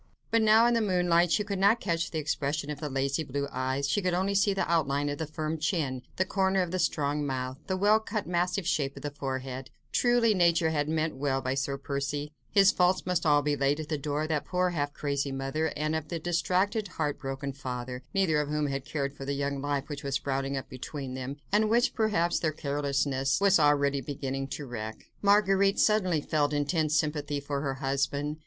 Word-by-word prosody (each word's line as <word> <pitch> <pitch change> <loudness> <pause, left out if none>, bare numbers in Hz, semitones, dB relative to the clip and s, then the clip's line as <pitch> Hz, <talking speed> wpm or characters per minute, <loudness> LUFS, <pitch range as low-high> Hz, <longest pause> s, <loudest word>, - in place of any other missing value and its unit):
But 230 - +4
now, 220 +1 +6
in 240 - +4
the 230 - +2
moonlight, 180 -4 +3
she 210 - +3
could 200 -2 -3
not 200 +4 +4
catch 170 -4 -1
the 160 - -4
expression 150 0 -2
of 145 - -6
the 150 -1 -4
lazy 135 +3 0
blue 140 0 -3
eyes; 130 +2 -1
she 175 +9 +1
could 180 -2 0
only 190 +2 0
see 200 +1 +3
the 195 - -1
outline 145 -3 +1
of 145 - -4
the 160 - -2
firm 155 +1 -3
chin, 150 -6 -1
the 185 - +1
corner 190 0 +1
of 175 - -5
the 185 - -1
strong 150 -3 0
mouth, 130 -1 -3
the 190 - -1
well 205 +3 +4
cut 215 -1 -4
massive 180 +1 0
shape 140 -3 0
of 140 - -9
the 145 - -3
forehead; 130 -2 -5 0.2
truly, 240 -2 +3
nature 170 -3 +3
had 150 -1 0
meant 155 -2 -1
well 135 -1 0
by 130 0 -2
Sir 140 +1 -2
Percy; 140 +1 -3 0.2
his 195 -1 +6
faults 180 +1 +2
must 180 -2 0
all 145 -1 +4
be 145 0 +1
laid 140 +1 +1
at 155 - -6
the 155 - 0
door 145 +1 -2
of 155 - -4
that 150 -2 0
poor, 180 0 0
half 145 -4 -1
crazy 140 -1 -2
mother, 135 +4 -1
and 155 +1 0
of 160 -1 -3
the 170 - -3
distracted 185 +5 0
heart 150 -5 -3
broken 135 0 -4
father, 125 -2 -5
neither 170 -6 +2
of 145 - -4
whom 150 0 0
had 135 -1 -2
cared 140 -2 -2
for 140 - -9
the 140 - -1
young 140 0 -2
life 145 -1 -2
which 145 -2 -6
was 140 -1 -2
sprouting 135 0 -1
up 135 - -5
between 130 +1 -6
them, 130 +2 -5
and 210 +1 +3
which, 240 +3 +3
perhaps, 205 -7 +1
their 155 - 0
very - - -20
carelessness 140 -1 0
was 200 -2 +5
already 140 -2 +3
beginning 135 0 -4
to 145 +1 -6
wreck. 110 -3 -7
Marguerite 200 -1 +4
suddenly 185 -7 +3
felt 150 0 0
intense 150 +1 +1
sympathy 150 -1 -1
for 140 0 -3
her 135 -2 -2
husband. 140 +2 -1
150 Hz, 220 wpm, -29 LUFS, 140-180 Hz, 0.2 s, now